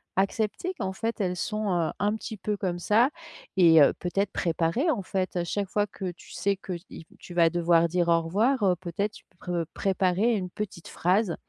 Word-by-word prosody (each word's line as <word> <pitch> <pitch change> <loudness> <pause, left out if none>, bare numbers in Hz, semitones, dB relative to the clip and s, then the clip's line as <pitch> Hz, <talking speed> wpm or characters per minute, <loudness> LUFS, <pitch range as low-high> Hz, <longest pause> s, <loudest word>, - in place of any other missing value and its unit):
accepter 215 - -1
qu'en 190 -3 -2
fait 225 +4 -3
elles 180 -1 0
sont, 215 +2 -2
heu, 170 -2 +1
un 205 +1 +1
petit 220 0 -7
peu 210 +2 -2
comme 180 -3 -2
ça 225 +8 +4 0.5
et 165 -4 +7
heu, 140 - +6
peut-être 195 +2 -1
préparer, 170 - 0
en 235 -9 -1
fait, 185 -1 -2
à 175 - 0
chaque 200 +3 -2
fois 205 0 +1
que 185 -2 -5
tu 175 - -16
sais 200 0 0
qu'il 175 -3 -8
tu 175 - -11
vas 170 -1 +5
devoir 170 0 +3
dire 175 0 0
«au 165 0 +4
revoir» 215 +10 +1
heu, 185 -2 +4
peut-être 185 +4 -3
tu - - -14 0.2
preux 175 -2 -2
préparer 195 +4 +1
une 185 -3 -3
petite 195 -5 -6
phrase, 185 +1 +1
190 Hz, 200 wpm, -27 LUFS, 175-210 Hz, 0.5 s, et